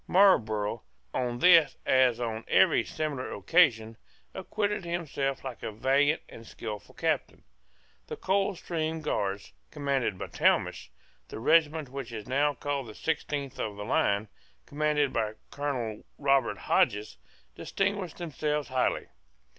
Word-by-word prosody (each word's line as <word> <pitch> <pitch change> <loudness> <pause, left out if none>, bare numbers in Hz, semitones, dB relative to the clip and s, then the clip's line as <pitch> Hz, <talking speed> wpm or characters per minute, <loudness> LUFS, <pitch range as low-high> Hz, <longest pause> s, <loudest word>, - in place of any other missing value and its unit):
Marlborough, 110 - +3 0.3
on 120 -1 -1
this 165 -2 +6
as 130 -3 +4
on 115 -2 -3
every - - +4
similar 150 -5 -4
occasion, 115 - +3 0.4
acquitted 210 -2 -2
himself 155 -6 -2
like 130 -3 -7
a - - -4
valiant 135 +7 +2
and 115 0 -12
skilful 105 -2 -7
captain. - - -1 0.6
The - - -6
Coldstream 170 -5 -1
Guards 100 - -2 0.2
commanded 135 - -1
by - - -5
Talmash, - - +1
and - - -35
the - - -7
regiment 155 +2 +3
which 135 -2 -6
is 110 -3 -7
now 145 +3 +1
called 140 -1 -3
the 105 - -10
sixteenth 145 -4 -3
of 105 -2 -3
the 105 - -5
line, 100 -2 +1 0.4
commanded 150 -1 0
by 110 -2 0 0.2
Colonel 125 -7 -3
Robert 140 -1 +2
Hodges, 105 +1 +1 0.4
distinguished 195 -4 -2
themselves 150 -3 -2
highly. 130 0 0
135 Hz, 130 wpm, -29 LUFS, 115-155 Hz, 0.6 s, this